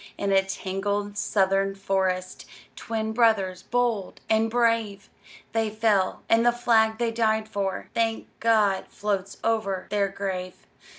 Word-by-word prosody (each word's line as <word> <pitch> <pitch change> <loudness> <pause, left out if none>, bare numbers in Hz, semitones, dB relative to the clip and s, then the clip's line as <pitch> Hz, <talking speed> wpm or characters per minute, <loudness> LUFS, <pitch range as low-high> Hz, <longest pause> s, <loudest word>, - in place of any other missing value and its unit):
In 200 -1 -1
a 195 0 +5
tangled 200 +2 -3
Southern 195 -1 +1
forest, 190 -2 -2 0.3
Twin 220 -1 -3
brothers 205 -6 +2
bold 240 -5 -1
and 220 +1 +3
brave, 230 -4 0 0.4
They 225 -1 0
fell; 210 -3 +1
and 225 0 +4
the 240 - +5
flag 225 -2 +2
they 235 -1 0
died 220 -1 +1
for, 200 -3 -3
Thank 225 -1 0
God! 215 -4 +2
floats 200 -1 -3
over 215 -5 0
their 205 -1 +2
grave. 185 -2 -4
205 Hz, 130 wpm, -25 LUFS, 195-225 Hz, 0.4 s, a